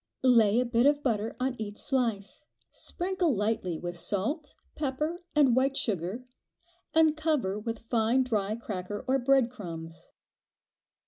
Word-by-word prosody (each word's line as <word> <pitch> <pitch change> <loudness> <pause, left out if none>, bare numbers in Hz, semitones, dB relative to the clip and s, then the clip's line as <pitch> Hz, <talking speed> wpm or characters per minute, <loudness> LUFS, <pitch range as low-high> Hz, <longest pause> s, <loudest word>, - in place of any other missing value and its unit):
Lay 230 -4 +5
a 250 - +2
bit 240 +2 +3
of 290 0 +2
butter 225 -3 -1
on 260 0 0
each 210 -1 -5
slice, 230 -4 -1 0.3
sprinkle 360 -5 -1
lightly 205 -5 -1
with 175 +1 -6
salt, 285 - -2 0.2
pepper, 300 +4 -2
and 275 -5 +5
white 270 +1 +2
sugar, 200 +4 -2 0.7
and 320 -1 +5
cover 300 -11 0
with 225 +1 -4
fine 235 +3 +2
dry 215 -4 -1
cracker, 205 -1 -5
or 265 +1 +3
bread 260 -1 +3
crumbs. 165 -8 -8
235 Hz, 135 wpm, -29 LUFS, 205-270 Hz, 0.7 s, Lay